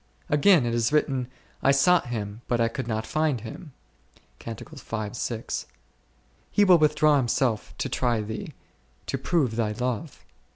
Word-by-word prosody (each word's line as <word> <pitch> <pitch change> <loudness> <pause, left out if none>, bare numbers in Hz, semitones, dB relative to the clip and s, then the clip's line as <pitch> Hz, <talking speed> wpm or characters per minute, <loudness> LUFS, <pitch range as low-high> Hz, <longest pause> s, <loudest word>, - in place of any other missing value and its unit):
Again 150 -1 +5
is 120 -1 +1
it 145 - -2
written, 135 -4 +1 0.3
i" - - +3
sought 150 +4 +4
Him 105 -2 -5
but 120 - 0
I 115 0 +3
could 130 +1 -5
not 110 -1 -2
find 155 -6 0
Him 120 - -9 0.7
Q: 115 - -6 1.9
He 205 - +3
will 180 -4 +6
withdraw 150 -1 +4
Himself 120 -3 0
to - - -2
try 120 -3 0
thee, 110 0 -6 0.5
to - - -2
prove 135 -10 +1
thy 110 -2 0
love. 125 +5 -4
125 Hz, 140 wpm, -26 LUFS, 115-150 Hz, 1.9 s, will